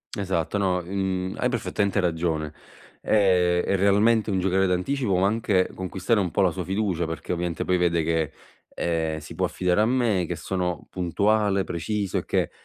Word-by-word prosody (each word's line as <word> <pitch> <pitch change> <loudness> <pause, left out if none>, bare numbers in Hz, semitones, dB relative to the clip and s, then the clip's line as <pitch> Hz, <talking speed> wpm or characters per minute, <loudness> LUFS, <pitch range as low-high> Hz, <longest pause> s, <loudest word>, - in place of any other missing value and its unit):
Esatto 95 -1 -1
no, 95 -2 +1
mhmm, 95 0 -2
hai 125 - +1
perfettamente 100 -4 -1
ragione. 80 -3 -1 0.5
Ehm, 90 -4 +3
è - - +1
realmente 105 +3 +3
un 95 -2 +1
giocare 95 +1 +2
d'anticipo 95 +4 0
ma 95 - +3
anche 100 -3 +1
conquistare 95 +4 -1
un 95 -3 0
po' 90 - 0
la 95 -2 +3
sua 90 +2 -4
fiducia 95 -3 -1
perché 80 - -5
ovviamente 85 -2 -2
poi 90 - +2
vede 85 -2 +2
che, 80 -2 0 0.4
ehm, 80 -2 -1
si 75 0 -9
può - - 0
affidare 90 +2 +1
a - - +4
me 120 -8 +1
che - - -3
sono 90 -2 -3
puntuale, 100 +2 +1
preciso 100 +4 -2
e - - -8
che - - 0
95 Hz, 175 wpm, -25 LUFS, 85-100 Hz, 0.5 s, a